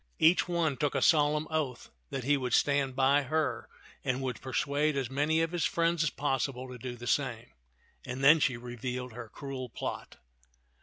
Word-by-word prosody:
Each 165 +4 +4
one 165 -5 0
took 145 -2 0
a 135 - +1
solemn 150 -1 +3
oath 150 -6 -2 0.2
that 135 -2 -4
he 145 +4 +3
would 125 -3 0
stand 140 -2 +2
by 135 +2 +4
her 155 +2 -1 0.3
and 130 0 0
would 125 -4 -3
persuade 140 +3 0
as 135 -2 -2
many 150 +4 +2
of 165 0 0
his 175 -2 -1
friends 170 -1 +1
as 165 - +2
possible 135 -2 -2
to 125 -1 -9
do 125 +1 -5
the 120 0 -9
same; 120 -2 -1 0.5
and 125 +2 -5
then 155 +4 +8
she 130 -4 +1
revealed 125 +1 -5
her 115 -1 -8
cruel 135 -1 -6
plot. - - -6
135 Hz, 185 wpm, -30 LUFS, 125-150 Hz, 0.5 s, then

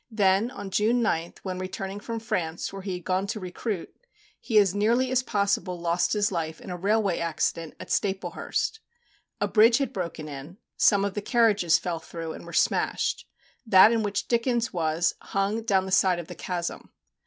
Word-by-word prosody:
Then, 205 0 +2
on 200 -6 -8
June 220 +5 +2
9th, 170 -6 -1
when 185 -1 -4
returning 195 +1 -5
from 230 +2 -5
France, 175 -7 -3
where 195 - -6
he 190 -1 -4
had 180 -1 -6
gone 185 +2 0
to 215 - -3
recruit, 185 +1 -5 0.4
he 225 -2 0
as 200 -3 +5
nearly 235 +5 +2
as 260 0 +3
possible 200 -5 -1
lost 170 +1 +1
his 205 -1 +1
life 160 -3 -3
in - - -9
a - - -3
railway 200 0 +1
accident 165 -1 -2
at - - -8
Staplehurst. 200 - -1 0.6
A - - +1
bridge 230 +2 +5
had 275 -4 -2
broken 170 -4 -4
in; 145 +5 -9 0.2
some 200 -2 +4
of 200 - -2
the 205 - -3
carriages 210 - +3
fell 170 -2 -3
through, 165 0 -7
and - - -10
were - - -8
smashed; - - 0 0.4
that 210 -2 +7
in 230 -1 +1
which 205 -1 -2
Dickens 235 0 0
was, 165 0 +1
hung 195 +3 -1
down 195 -4 +1
the 190 - -6
side 185 -1 +4
of 175 - -5
the - - -7
chasm. 175 -2 -4
195 Hz, 190 wpm, -26 LUFS, 175-220 Hz, 0.6 s, that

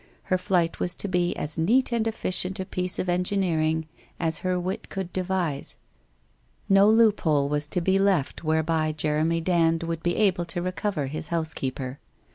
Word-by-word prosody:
Her 185 - +1
flight 175 -2 0
was 180 0 0
to - - -3
be 180 -2 0
as 150 +2 -1
neat 250 +11 +3
and 230 -1 0
efficient 190 -3 +1
a 190 - -3
piece 180 0 -2
of 185 - -2
engineering 175 -4 +1 0.3
as 165 -2 -1
her 185 -1 -1
wit 185 +2 -4
could 190 -2 -5
devise. 180 -6 -2 0.9
No 195 +1 +5
loop 220 -1 +4
hole 145 -3 +1
was 150 0 -1
to 180 - -1
be 190 +3 +2
left 190 -9 +1
whereby 155 0 +1
Jeremy 155 +2 0
Dand 165 -1 +2
would 165 -1 -3
be 175 +1 0
able 185 -5 +2
to 170 +1 -4
recover 185 -3 -2
his 155 +4 -5
housekeeper. 140 -5 -3
175 Hz, 170 wpm, -25 LUFS, 160-190 Hz, 0.9 s, No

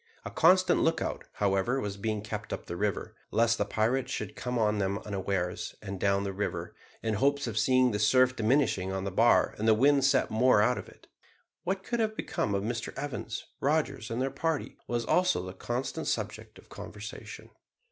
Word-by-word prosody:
A - - -5
constant 185 +2 +4
lookout, 165 - 0
however, 100 +6 +1
was 100 -5 -3 0.3
kept 105 0 -6
up - - -4
the 85 - -5
river, 100 0 -2
lest 115 0 +2
the 100 - +2
pirates 115 +6 0
should 105 -1 -4
come 125 0 -3
on 105 -2 +2
them 100 0 0
unawares, 95 -3 -2
and 100 -2 -6
down 100 0 +2
the 100 -1 -3
river, 100 +2 -3 0.3
in 110 -1 0
the 105 - -2
hopes 140 +2 +2
of 115 - -4
seeing 130 +3 +3
the 105 - -2
surf 130 +4 +4
diminishing 110 -5 +1
on 95 0 -3
the 100 - -3
bar 115 +6 +4
and 110 - 0
the 110 - +6
wind 140 +4 +4
set 135 -1 +3
more 125 0 +4
out 125 +4 +3
of - - -9
it. - - -19 0.6
What 190 +1 -1
could 235 +3 -2
have 220 -1 0
become 100 - -1
of 100 - -1
Mr 120 +2 -3
Evans, 130 -5 -4
Rogers, 140 -6 0
and 115 - -3
their 135 +1 0
party, 160 +2 -2
was 120 -1 -1
also 180 - +2
the 95 - -7
constant 125 +10 -3
subject - - -3
of - - -17
conversation. - - -9
115 Hz, 195 wpm, -29 LUFS, 100-135 Hz, 0.6 s, the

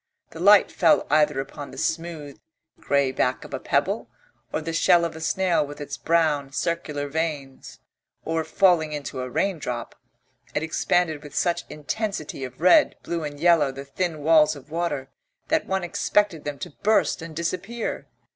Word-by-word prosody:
The 160 - -10
light 200 +3 +6
fell 200 - +3
either 150 -2 +3
upon 135 +1 -6
the - - -12
smooth, 160 -4 -3 0.4
grey 140 -2 +1
back 130 -1 0
of - - -11
a - - -2
pebble, - - 0 0.4
or, - - -1
the 165 +1 -5
shell 170 +1 +4
of 165 - -5
a 160 - -8
snail 180 +1 +1
with 145 +1 -9
its 145 0 -5
brown, 155 -4 +1
circular 150 -3 -2
veins, 145 -3 -4 0.5
or 160 0 0
falling 170 -4 +3
into 140 -3 -5
a 130 - -4
raindrop, 125 -7 -2 0.6
it 150 - 0
expanded 160 -1 0
with 150 -1 -11
such 175 -1 0
intensity 155 -2 -4
of 125 -1 -8
red, 180 +1 +5
blue 170 -1 -3
and 145 -1 -6
yellow 165 -4 +4
the 135 +1 -8
thin 155 +1 -3
walls 155 -1 +5
of 140 +1 -14
water 160 -5 -2 0.4
that - - +1
one 190 -1 -1
expected 175 -1 0
them 145 -1 -4
to - - -7
burst 215 -4 +2
and 165 -1 -8
disappear. 185 +8 -3
160 Hz, 165 wpm, -24 LUFS, 145-170 Hz, 0.6 s, light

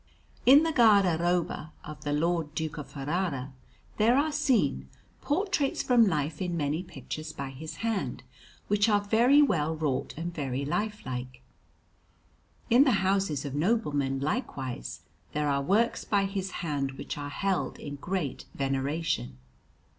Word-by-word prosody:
In 280 +4 +9
the 325 - +1
guardaroba 180 - +3
of 155 0 -9
the 145 - -2
Lord 160 0 0
Duke 155 -1 -3
of 145 - -7
Ferrara 145 -2 -3 0.4
there 230 +4 +4
are 305 +2 +2
seen 290 -5 +1 0.3
portraits 300 -3 0
from 240 -3 +5
life 150 -2 -1
in 175 -2 -1
many 150 +2 0
pictures 155 -3 -7
by 135 -1 -6
his 155 +4 -8
hand, 225 -4 -2 0.4
which 205 +2 +3
are 205 -1 +3
very 240 +8 +5
well 160 - +1
wrought 145 -4 -2
and 170 +2 -4
very 140 -3 -3
lifelike. 130 - -4 1.3
In 245 +4 +8
the 220 -9 +2
houses 190 -7 +1
of 140 - -4
noblemen, 145 - 0
likewise, 140 - -3 0.3
there 150 0 0
are 140 -1 +1
works 210 +10 +1
by 200 -1 +1
his 195 -1 -3 0.2
hand 140 -3 -1
which - - -6
are 145 -1 -5
held 195 +5 -1
in 145 -1 -7
great 170 -3 -3
veneration. 135 - -1
165 Hz, 140 wpm, -28 LUFS, 145-210 Hz, 1.3 s, In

